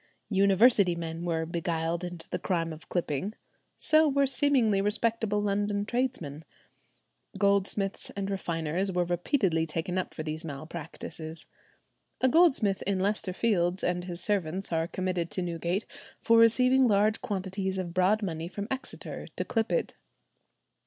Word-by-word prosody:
University 200 Hz, -1 st, +5 dB
men 165 Hz, 0 st, -5 dB
were 165 Hz, -1 st, -1 dB
beguiled 170 Hz, 0 st, -2 dB
into 175 Hz, -2 st, -6 dB
the -, -, -2 dB
crime 165 Hz, -3 st, -1 dB
of 155 Hz, -, -13 dB
clipping; 175 Hz, +4 st, -2 dB, 0.4 s
so 310 Hz, 0 st, +4 dB
were 280 Hz, 0 st, +3 dB
seemingly 255 Hz, -7 st, +3 dB
respectable 210 Hz, 0 st, +2 dB
London 205 Hz, 0 st, 0 dB
tradesmen. 220 Hz, -, -2 dB, 0.9 s
Goldsmiths 200 Hz, 0 st, 0 dB
and 200 Hz, -1 st, -3 dB
refiners 180 Hz, -1 st, -2 dB
were 180 Hz, -1 st, +1 dB
repeatedly 175 Hz, -, +1 dB
taken 165 Hz, +4 st, -2 dB
up 185 Hz, -, -5 dB
for 155 Hz, -, -4 dB
these 155 Hz, +1 st, -4 dB
malpractices. 160 Hz, +1 st, -6 dB, 0.7 s
A 260 Hz, -, +3 dB
goldsmith 260 Hz, -, +4 dB
in 200 Hz, -1 st, +1 dB
Leicester 200 Hz, 0 st, 0 dB
Fields 180 Hz, -3 st, +1 dB
and 175 Hz, 0 st, 0 dB
his 175 Hz, -2 st, -5 dB
servants 195 Hz, -2 st, -1 dB
are 165 Hz, 0 st, 0 dB
committed 180 Hz, -2 st, -2 dB
to 185 Hz, -, -2 dB
Newgate 170 Hz, +3 st, -2 dB, 0.3 s
for 230 Hz, 0 st, +4 dB
receiving 255 Hz, +3 st, +5 dB
large 210 Hz, 0 st, +2 dB
quantities 190 Hz, -3 st, -3 dB
of 175 Hz, -2 st, -4 dB
broad 190 Hz, +4 st, +2 dB
money 165 Hz, -3 st, -3 dB
from 200 Hz, +3 st, -5 dB
Exeter 265 Hz, +1 st, -6 dB
to -, -, -2 dB
clip 225 Hz, -1 st, -1 dB
it. -, -, 0 dB
190 Hz, 140 wpm, -28 LUFS, 170-210 Hz, 0.9 s, University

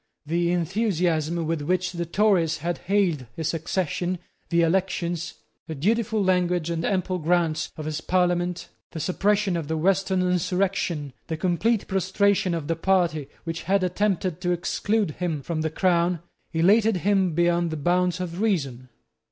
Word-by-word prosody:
The 170 Hz, +2 st, +1 dB
enthusiasm 170 Hz, -3 st, 0 dB
with 165 Hz, -1 st, -1 dB
which 180 Hz, +4 st, 0 dB
the 170 Hz, -1 st, -4 dB
Tories 175 Hz, -4 st, +2 dB
had 170 Hz, +3 st, -3 dB
hailed 180 Hz, -10 st, 0 dB
his 160 Hz, 0 st, -2 dB
accession, 175 Hz, +2 st, -1 dB, 0.3 s
the 170 Hz, -1 st, +3 dB
elections, 175 Hz, -1 st, -1 dB, 0.3 s
the 160 Hz, -, -5 dB
dutiful 215 Hz, +6 st, +1 dB
language 180 Hz, -3 st, +1 dB
and 165 Hz, -1 st, -2 dB
ample 185 Hz, -1 st, 0 dB
grants 165 Hz, -1 st, +1 dB
of 155 Hz, -, -5 dB
his 155 Hz, 0 st, -3 dB
Parliament, 180 Hz, 0 st, 0 dB, 0.3 s
the 165 Hz, -, -4 dB
suppression 195 Hz, +3 st, +1 dB
of 165 Hz, -3 st, -3 dB
the 160 Hz, +1 st, -1 dB
Western 190 Hz, +2 st, +2 dB
insurrection, 180 Hz, -4 st, 0 dB
the 160 Hz, -, -3 dB
complete 200 Hz, +6 st, +1 dB
prostration 190 Hz, -1 st, +1 dB
of 155 Hz, -3 st, -4 dB
the 165 Hz, -, 0 dB
party 165 Hz, -5 st, +1 dB, 0.2 s
which 165 Hz, 0 st, -4 dB
had 195 Hz, +2 st, +1 dB
attempted 185 Hz, -2 st, 0 dB
to 180 Hz, -1 st, 0 dB
exclude 200 Hz, +3 st, 0 dB
him 165 Hz, -6 st, -2 dB
from 160 Hz, +1 st, -2 dB
the 160 Hz, -, 0 dB
crown, 175 Hz, 0 st, +1 dB, 0.3 s
elated 205 Hz, +5 st, +4 dB
him 190 Hz, -5 st, +2 dB
beyond 175 Hz, 0 st, +2 dB
the 160 Hz, -, -4 dB
bounds 180 Hz, +3 st, +1 dB
of 180 Hz, +1 st, -4 dB
reason. 135 Hz, -, -1 dB
175 Hz, 150 wpm, -25 LUFS, 165-190 Hz, 0.3 s, elated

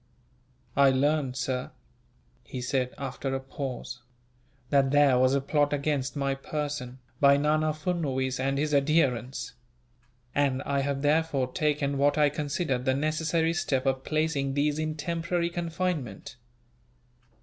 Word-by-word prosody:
"I 140 Hz, -1 st, +6 dB
learned, 135 Hz, 0 st, +1 dB
sir," 125 Hz, 0 st, -2 dB, 0.7 s
he 125 Hz, -, -7 dB
said, 125 Hz, 0 st, -1 dB
after 135 Hz, 0 st, -3 dB
a -, -, -1 dB
pause, 130 Hz, -2 st, -6 dB, 0.7 s
"that 140 Hz, -2 st, +4 dB
there 140 Hz, -3 st, +5 dB
was 130 Hz, +1 st, +4 dB
a 140 Hz, -, +1 dB
plot 145 Hz, +1 st, +1 dB
against 145 Hz, -1 st, -1 dB
my 140 Hz, -1 st, 0 dB
person, 140 Hz, -2 st, -4 dB, 0.2 s
by 140 Hz, 0 st, +6 dB
Nana 155 Hz, +2 st, +2 dB
Furnuwees 145 Hz, -5 st, -2 dB
and 135 Hz, +1 st, 0 dB
his 150 Hz, +1 st, 0 dB
adherents; 140 Hz, -4 st, +1 dB, 0.8 s
and 140 Hz, -1 st, +1 dB
I 140 Hz, -1 st, 0 dB
have 140 Hz, 0 st, -1 dB
therefore 145 Hz, -4 st, +1 dB
taken 145 Hz, -2 st, 0 dB
what 145 Hz, +2 st, +3 dB
I 150 Hz, -1 st, +5 dB
considered 145 Hz, -3 st, -2 dB
the 130 Hz, -1 st, +2 dB
necessary 160 Hz, +3 st, 0 dB
step 135 Hz, -6 st, -1 dB
of 135 Hz, 0 st, 0 dB
placing 155 Hz, -3 st, 0 dB
these 145 Hz, +1 st, +1 dB
in 155 Hz, 0 st, -2 dB
temporary 170 Hz, +2 st, -1 dB
confinement." 165 Hz, -, -3 dB
140 Hz, 135 wpm, -28 LUFS, 135-155 Hz, 0.8 s, I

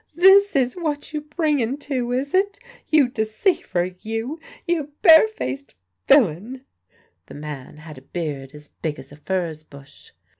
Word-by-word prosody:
"This 385 Hz, +2 st, +6 dB
is 255 Hz, -2 st, +2 dB
what 310 Hz, -4 st, -4 dB
you 300 Hz, -, -2 dB
bring 300 Hz, -2 st, 0 dB
en 240 Hz, +5 st, -1 dB
to, 260 Hz, -4 st, -3 dB
is 270 Hz, +3 st, -2 dB
it? 400 Hz, +2 st, +2 dB, 0.3 s
You 300 Hz, -4 st, +4 dB
deceiver, 220 Hz, -, -1 dB
you! 225 Hz, -, -4 dB, 0.3 s
You 310 Hz, -4 st, -2 dB
bare 320 Hz, -, +8 dB
faced 135 Hz, -, -6 dB, 0.3 s
villain!" 245 Hz, -, +3 dB, 0.6 s
(The -, -, -11 dB
man 145 Hz, -1 st, -8 dB
had 155 Hz, -3 st, -11 dB
a -, -, -23 dB
beard 140 Hz, -2 st, -5 dB
as 150 Hz, 0 st, -12 dB
big 155 Hz, -2 st, -5 dB
as 135 Hz, +1 st, -12 dB
a -, -, -11 dB
furze 165 Hz, 0 st, -3 dB
bush.) 140 Hz, -2 st, -16 dB
230 Hz, 155 wpm, -22 LUFS, -, 0.6 s, bare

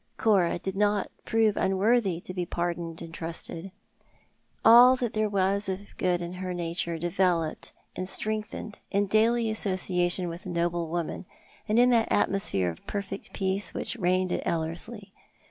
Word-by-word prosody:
Cora 195 Hz, -7 st, +3 dB
did 190 Hz, +2 st, -5 dB
not 205 Hz, 0 st, +1 dB
prove 225 Hz, -2 st, +2 dB
unworthy 195 Hz, -1 st, +2 dB
to 185 Hz, -, -7 dB
bo 180 Hz, -1 st, -3 dB
pardoned 170 Hz, -1 st, -3 dB
and 165 Hz, -1 st, -10 dB
trusted. 165 Hz, +2 st, -5 dB, 0.9 s
All 245 Hz, +3 st, +9 dB
that 245 Hz, -3 st, -3 dB
there 215 Hz, 0 st, +1 dB
was 200 Hz, 0 st, +1 dB
of 190 Hz, +2 st, -6 dB
good 175 Hz, -1 st, 0 dB
in 170 Hz, +1 st, -5 dB
her 185 Hz, -1 st, -3 dB
nature 170 Hz, -1 st, -2 dB
developed 170 Hz, -1 st, 0 dB, 0.2 s
and 185 Hz, 0 st, -4 dB
strengthened 215 Hz, 0 st, -3 dB
in 200 Hz, +1 st, +1 dB
daily 225 Hz, +3 st, +3 dB
association 185 Hz, -3 st, +1 dB
with 170 Hz, +3 st, -7 dB
a -, -, -5 dB
noble 170 Hz, -1 st, -1 dB
woman, 170 Hz, +2 st, -4 dB, 0.4 s
and 215 Hz, -, +2 dB
in 245 Hz, +1 st, +6 dB
that 230 Hz, -2 st, +2 dB
atmosphere 100 Hz, -, +1 dB
of 80 Hz, -, -14 dB
perfect 200 Hz, -1 st, -5 dB
peace 195 Hz, +1 st, -1 dB
which -, -, -3 dB
reigned 185 Hz, -3 st, +1 dB
at -, -, -1 dB
Ellerslie. 185 Hz, +6 st, -3 dB
190 Hz, 155 wpm, -27 LUFS, 175-210 Hz, 0.9 s, All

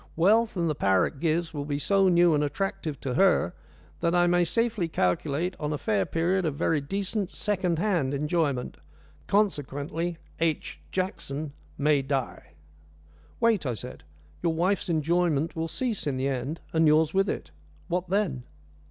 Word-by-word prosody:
Wealth, 215 Hz, +5 st, +3 dB
and 170 Hz, -1 st, +1 dB
the 155 Hz, -, +1 dB
power 95 Hz, -9 st, +3 dB
it 145 Hz, -, -6 dB
gives, 165 Hz, +1 st, 0 dB
will 145 Hz, -2 st, -3 dB
be 145 Hz, 0 st, -2 dB
so 195 Hz, +6 st, +3 dB
new 175 Hz, -1 st, +5 dB
and 150 Hz, 0 st, +2 dB
attractive 155 Hz, -1 st, -3 dB
to 130 Hz, -, -2 dB
her 185 Hz, -, +3 dB, 0.5 s
that 170 Hz, +1 st, +1 dB
I 175 Hz, 0 st, +5 dB
may 175 Hz, 0 st, +3 dB
safely 225 Hz, -1 st, 0 dB
calculate 155 Hz, -, 0 dB
on 150 Hz, 0 st, -2 dB
a 150 Hz, -, -1 dB
fair 100 Hz, -8 st, 0 dB
period 180 Hz, +3 st, +1 dB
of 155 Hz, -4 st, -1 dB
very 150 Hz, +1 st, +1 dB
decent 195 Hz, +5 st, -2 dB
second 185 Hz, -6 st, -1 dB
hand 175 Hz, -8 st, +1 dB
enjoyment; 150 Hz, -3 st, -1 dB, 0.5 s
consequently, 165 Hz, -3 st, 0 dB, 0.2 s
H. 165 Hz, -2 st, -1 dB
Jackson 170 Hz, -6 st, -3 dB, 0.2 s
may 145 Hz, -1 st, +3 dB
die." 135 Hz, -, -3 dB, 0.9 s
"Wait," 230 Hz, -5 st, +3 dB
I 120 Hz, -, -1 dB
said, 125 Hz, +3 st, -9 dB, 0.4 s
"your 165 Hz, -1 st, +1 dB
wife's 185 Hz, +3 st, 0 dB
enjoyment 165 Hz, -1 st, +1 dB
will 165 Hz, 0 st, -2 dB
cease 225 Hz, +3 st, -2 dB
in 135 Hz, -2 st, -1 dB
the 130 Hz, +1 st, 0 dB
end, 135 Hz, +4 st, -3 dB
and 160 Hz, -1 st, +4 dB
yours 155 Hz, +1 st, +4 dB
with 195 Hz, +1 st, +2 dB
it. 75 Hz, -, -4 dB, 0.4 s
What 180 Hz, 0 st, -2 dB
then?" 185 Hz, -10 st, 0 dB
165 Hz, 160 wpm, -27 LUFS, 145-185 Hz, 0.9 s, new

